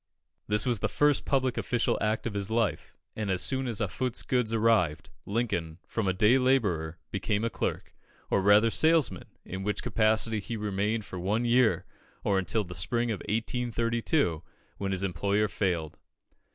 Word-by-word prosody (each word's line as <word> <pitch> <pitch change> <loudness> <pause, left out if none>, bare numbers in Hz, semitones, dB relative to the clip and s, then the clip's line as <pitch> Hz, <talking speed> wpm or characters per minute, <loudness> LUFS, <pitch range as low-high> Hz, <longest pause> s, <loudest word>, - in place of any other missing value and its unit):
This 105 0 +1
was 120 -4 0
the - - -1
first 145 -1 +2
public 130 -3 +1
official 120 -2 +1
act 110 +1 0
of 120 - -2
his 100 0 -2
life; 115 -1 -1 0.2
and 105 -2 -3
as 95 -1 +1
soon 130 -1 +1
as 115 -3 -1
Offutt's 115 +4 -2
goods 125 -4 0
arrived, 110 -9 +1 0.2
Lincoln, 100 -8 -2
from 115 -4 -2
a - - +3
day 105 +7 +4
labourer, 100 -12 +1
became 105 +2 -1
a 115 - -1
clerk, - - -3 0.4
or - - +3
rather 105 +3 +5
salesman, 155 - +2 0.2
in 95 +1 -6
which 105 +1 -2
capacity 110 0 +2
he 115 +3 -5
remained 105 +1 -1
for 90 - -7
one 105 +7 0
year, 120 -1 +3 0.4
or 100 -1 +2
until 105 +3 0
the 90 -2 -9
spring 115 +9 0
of 105 - -3
1832, 115 - 0 0.4
when 100 - -2
his 95 0 0
employer 100 +3 +1
failed. 90 -7 -2
110 Hz, 165 wpm, -28 LUFS, 95-115 Hz, 0.4 s, rather